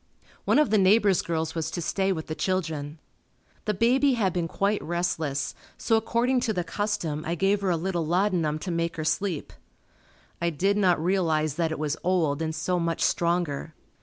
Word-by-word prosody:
One - - +3
of 300 -8 +3
the 215 - +4
neighbor's 195 0 +4
girls 160 -1 -2
was 160 -2 -2
to 165 - -4
stay 190 +3 0
with 160 -4 -3
the 155 - -4
children. 160 -5 -2 0.7
The 210 -1 0
baby 260 +6 +3
had 200 -7 +1
been 175 -2 -1
quite 200 +5 0
restless, 165 -5 -2 0.2
so 225 - +1
according 235 +3 +1
to 235 -3 0
the 180 -3 -1
custom, 170 -4 -2
I 165 +2 -2
gave 195 +4 +1
her 195 - 0
a 170 - +2
little 175 0 -1
laudanum 170 -2 +1
to 180 - -2
make 170 0 -1
her 155 - -4
sleep. 160 +1 -1 0.9
I 170 - +2
did 190 +6 +1
not 185 -5 +3
realize 160 -4 +1
that 165 +1 -1
it 160 - -3
was 150 0 -2
old 165 -5 +1
and 160 -1 -2
so 180 +3 -1
much 165 -1 -1
stronger. 170 -3 0
175 Hz, 190 wpm, -26 LUFS, 160-195 Hz, 0.9 s, the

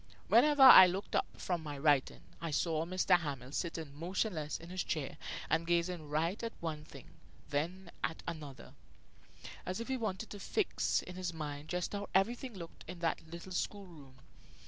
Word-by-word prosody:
Whenever 295 -2 +6
I 190 -8 +12
looked 190 +3 -3
up - - +2
from 175 -3 -2
my 145 -2 -6
writing 140 -2 +2 0.2
I 165 - -3
saw 155 +1 0
M. 165 +2 -5 0.3
Hamel 135 -5 -5
sitting 160 -2 -4
motionless 170 0 -2
in 165 - -11
his 185 -1 -2
chair 150 -3 -3 0.3
and 165 +1 +1
gazing 170 -2 0
first 165 +8 -1
at 230 - -3
one 155 -3 -4
thing, - - -12 0.4
then 170 +5 -2
at 160 - -2
another, 150 -5 -7 0.9
as 185 +4 -3
if 230 - -5
he 265 - 0
wanted 215 -2 -3
to 205 - -7
fix 410 - 0
in 180 0 -9
his 180 -2 -3
mind 150 -1 -6
just 180 +2 -2
how 205 0 -4
everything 235 +5 +1
looked 170 -3 -9
in 180 +1 -7
that 165 -1 -1
little 170 +2 -8
school 200 +2 -2
room. 145 -7 -14
170 Hz, 175 wpm, -34 LUFS, 155-190 Hz, 0.9 s, I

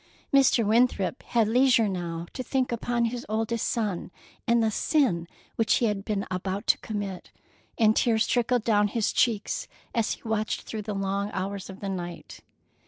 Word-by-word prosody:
Mr. 265 -4 +5
Winthrop 225 0 +2
had 230 -3 +1
leisure 245 -1 +4
now 170 -3 -3
to - - -4
think 255 0 -1
upon 235 0 0
his 235 +1 -3
oldest 225 +1 -1
son, 210 -7 -2 0.4
and 235 0 +4
the 220 - +2
sin 215 - +1 0.3
which 225 - +3
he 240 - +2
had 205 -3 -1
been 200 -1 -2
about 190 +3 -3
to - - +3
commit, 205 -4 -5 0.5
and 220 -1 +4
tears 225 -2 +3
trickled 245 -1 +1
down 210 -2 +3
his 220 +1 -1
cheeks 220 -4 +1 0.3
as 230 -3 +1
he - - -11
watched 215 -1 -1
through 220 - -5
the 210 0 -4
long 195 +1 -1
hours 195 +1 -4
of 190 - -10
the 200 - -3
night. 175 -3 -6
215 Hz, 170 wpm, -27 LUFS, 195-235 Hz, 0.5 s, Mr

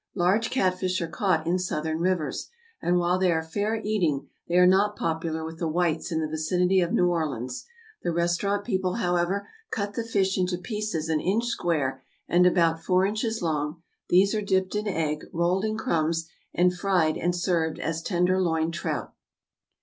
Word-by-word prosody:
= - - -44
Large 195 +5 +2
catfish 185 -5 0
are 170 - -2
caught 165 0 0
in 175 +2 +1
Southern 160 -3 -2
rivers; 175 -3 -1 0.3
and 175 +1 +2
while 175 +1 +2
they 185 -1 +3
are 160 -1 0
fair 205 +7 -1
eating, 175 -10 0 0.2
they 170 - -1
are 180 0 +7
not 200 +3 +4
popular 160 0 -2
with 160 0 -8
the 170 - -1
whites 170 +1 0
in 160 - 0
the 155 - -1
vicinity 180 +4 +1
of 175 -1 +1
New 180 - +3
Orleans. 150 - -2 0.3
The 175 - -1
restaurant 175 +4 0
people, 190 -5 0
however, 180 -1 0 0.2
cut 200 -1 -3
the 230 - -2
fish 195 -4 0
into 180 -1 0
pieces 210 -5 -3
an 160 -1 +1
inch 215 +6 +1
square 150 - -1 0.3
and 180 +1 +5
about 165 -2 +2
four 185 0 +3
inches 220 +1 -1
long; 155 0 -2 0.3
these 195 +4 +4
are 215 - 0
dipped 190 -2 0
in 210 0 -2
egg, 155 -5 -1
rolled 175 +4 +1
in 215 0 -1
crumbs, 165 -4 0 0.2
and 180 +1 +2
fried 175 -4 +2
and 175 +1 0
served 170 -3 0
as 165 0 -3
tenderloin 175 -3 +1
trout. 170 - -3
180 Hz, 180 wpm, -26 LUFS, 160-190 Hz, 0.3 s, are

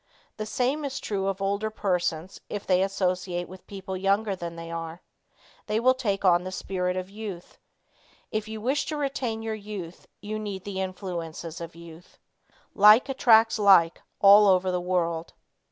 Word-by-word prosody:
The 215 0 -4
same 260 +7 0
is 275 -1 -3
true 195 -2 -2
of 195 0 -2
older 200 +2 -1
persons 180 -4 -2
if 205 -1 -5
they 185 -1 +3
associate 185 -2 -1
with 185 0 -13
people 195 -1 -6
younger 195 +2 +1
than 170 -2 -6
they 165 0 -8
are. 165 +1 -6 0.6
They 215 0 0
take 205 -7 -2
on 175 -1 +4
the 185 - -5
spirit 180 -1 -2
of 185 0 -4
youth. 200 -4 -8 0.7
If 215 0 -2
you 220 0 -6
wish 270 +5 0
to 305 - -3
retain 260 -6 -2
your 225 0 -3
youth 200 -5 -8
you 215 +1 -5
need 200 -3 -5
the 195 -1 -4
influences 175 -3 -5
of 165 0 -8
youth. 170 0 -14 0.6
Like 210 +6 +6
attracts 225 -4 +4
like 190 -5 +5 0.2
all 205 +1 +8
over 185 -1 +3
the 180 0 -1
world. 170 -2 -1
195 Hz, 165 wpm, -26 LUFS, 180-215 Hz, 0.7 s, all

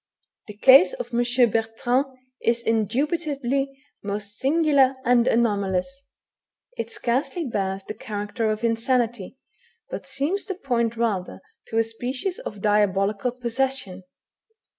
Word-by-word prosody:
The 210 -1 -10
case 270 - +7
of - - -6
M. 240 0 +3
Bertrand 230 +5 0 0.3
is 235 0 +1
indubitably 275 - 0 0.3
most 205 0 -4
singular 280 -2 +3
and 240 0 +4
anomalous; 220 +3 0 0.7
it - - -4
scarcely 275 +8 -1
bears 195 -5 -2
the 215 - -6
character 215 +1 -3
of 215 +1 -2
insanity, 235 -1 0 0.5
but - - -6
seems 335 +9 -1
to 390 -2 -4
point 235 -8 -1
rather 210 -6 -1 0.3
to 225 - -3
a 225 - +5
species 255 - -4
of 205 -2 -7
diabolical 205 +1 +2
possession. 250 -5 -2
235 Hz, 120 wpm, -24 LUFS, 210-270 Hz, 0.7 s, case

